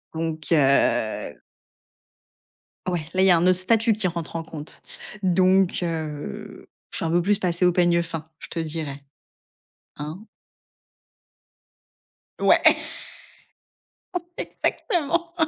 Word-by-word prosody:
Donc, 160 -1 -3
heu 135 -7 +2 1.5
Ouais, 175 -4 -1
là, 185 - +2
il - - +5
y - - +7
a 175 - +7
un 165 - +1
autre 185 -1 +4
statut 225 +4 +3
qui 210 -2 0
rentre 170 -1 -4
en 165 - -2
compte 155 -2 -8 0.4
donc 185 0 +3
heu, 155 - -5 0.2
je - - -3
suis - - -1
un 165 - 0
peu 175 +1 +3
plus 200 +3 +2
passée 180 -2 +1
au 180 - +4
peigne 175 -1 +3
fin, 160 -2 -6
je - - -10
te - - -5
dirais. 155 -3 -4 0.9
Hein. 155 +7 -6 2.2
Ouais. - - +5 1.8
Exactement. 340 - -1
170 Hz, 120 wpm, -24 LUFS, 160-185 Hz, 2.2 s, y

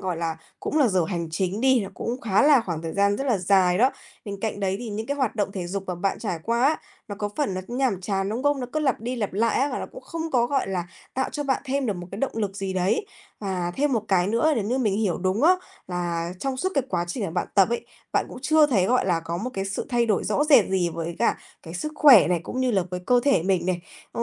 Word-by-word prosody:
gọi 185 -3 -2
là, 165 -1 -2 0.2
cũng 310 - -1
là 275 - +5
giờ 185 -4 +2
hành 170 -4 -3
chính 185 +5 -1
đi, 260 -2 +4
là 195 - -4
cũng 245 +3 -4
khá 205 +2 +2
là 285 -4 +6
khoảng 170 -7 -4
thời 165 -1 -4
gian 200 0 +2
rất 275 - -3
là 235 -6 +2
dài 185 0 +3
đó. 255 +3 +5 0.3
Bên 200 -2 -6
cạnh 215 -2 -3
đấy 195 -1 0
thì 240 - -6
những 220 +2 -4
cái 285 - -2
hoạt 255 -5 -1
động 200 -1 -1
thể 180 -3 -4
dục 195 +2 -3
mà 180 - -2
bạn 190 +3 -1
trải 190 -7 -3
qua 235 +2 0
á, 310 +3 +4 0.3
nó 205 - -4
có 205 - -1
phần 280 -11 0
nó 185 - -2
nhàm 245 -6 0
chán, 195 0 -1
đúng 230 +5 -3
không? 290 -2 +2
Nó 250 - -3
cứ 310 - 0
lặp 265 -7 +1
đi 245 +3 -3
lặp 210 -4 -2
lại 220 +3 +1
á 280 - +2
và - - -2
nó - - -4
cũng - - -10
không 325 -1 -5
có, 240 -2 +3
gọi 270 -5 0
là, 180 -2 -2 0.3
tạo 265 0 -1
cho 295 - -2
bạn 270 -1 0
thêm 270 -1 -1
được 210 - 0
một 175 0 -7
cái 200 - -7
động 275 - -1
lực 200 -3 -2
gì 195 -1 -3
đấy. 190 - 0 0.3
Và 185 -3 -2
thêm 285 0 +1
một 225 -3 +1
cái 185 -2 +3
nữa 235 +10 +2
nếu 215 -5 -1
như 250 +5 0
mình 210 -5 +1
hiểu 200 -6 0
đúng 190 +7 0
á, 365 +3 +6 0.3
là 175 -1 -2
trong 265 +5 -2
suốt 375 +8 0
cái 275 - +2
quá 175 -2 0
trình 205 +4 -3
mà 165 - -3
bạn 175 +1 -1
tập 195 0 +5
ấy, 235 - -3 0.3
bạn - - +1
cũng - - -9
chưa 310 +1 +5
thấy, 205 -10 +2
gọi 250 -5 +2
là, 170 -3 +1
có 165 +1 -4
một 235 +8 -4
cái 195 0 -2
sự 195 - -3
thay 240 -3 +2
đổi 210 -4 +1
rõ 295 - +1
rệt 280 -9 +6
gì 185 -2 +1
với 170 0 -4
cả - - +2 0.3
cái 165 +1 -9
sức 305 +12 -4
khỏe 260 - +7
này 175 -2 +1
cũng 255 - -4
như 255 -1 +2
là 195 -4 +2
với 180 - -4
cơ 245 -1 +4
thể 275 - +3
mình 185 -2 +1
này. 180 -1 0 0.3
Ừ, 235 - -2
205 Hz, 290 wpm, -25 LUFS, 185-260 Hz, 0.3 s, khỏe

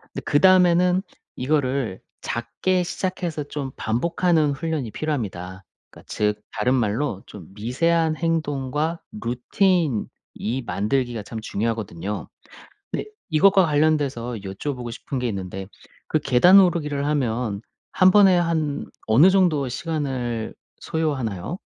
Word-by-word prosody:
근데 - - -9
그다음에는 180 +2 +4 0.3
이거를 130 -6 -1 0.2
작게 120 +11 -1
시작해서 175 -3 -3
좀 140 -1 -5
반복하는 160 +6 +1
훈련이 150 -4 -3
필요합니다. 95 - -4 0.3
그러니까 - - -17
즉 105 0 -1
다른 125 +5 +1
말로 110 -2 -1
좀 95 -6 -11
미세한 155 +9 +1
행동과 155 -1 -1 0.2
루틴 140 - +1 0.3
이 125 +5 -3
만들기가 120 +2 -1
참 110 +3 -7
중요하거든요. 105 -3 -3 0.6
근데 - - -3 0.2
이것과 190 +4 +5
관련돼서 145 -6 +1
여쭤보고 120 +5 -5
싶은 130 +3 -5
게 125 - -1
있는데 95 -1 -5 0.4
그 - - +1
계단 175 +9 +6
오르기를 150 -6 +1
하면 120 -7 -1 0.3
1 185 - +5
번에 195 -2 +6
한 160 -4 -1 0.2
어느 130 +12 +6
정도의 175 -8 +2
시간을 130 -6 -3 0.3
소요하나요? 140 - -2
140 Hz, 285 characters per minute, -23 LUFS, 115-165 Hz, 0.6 s, 계단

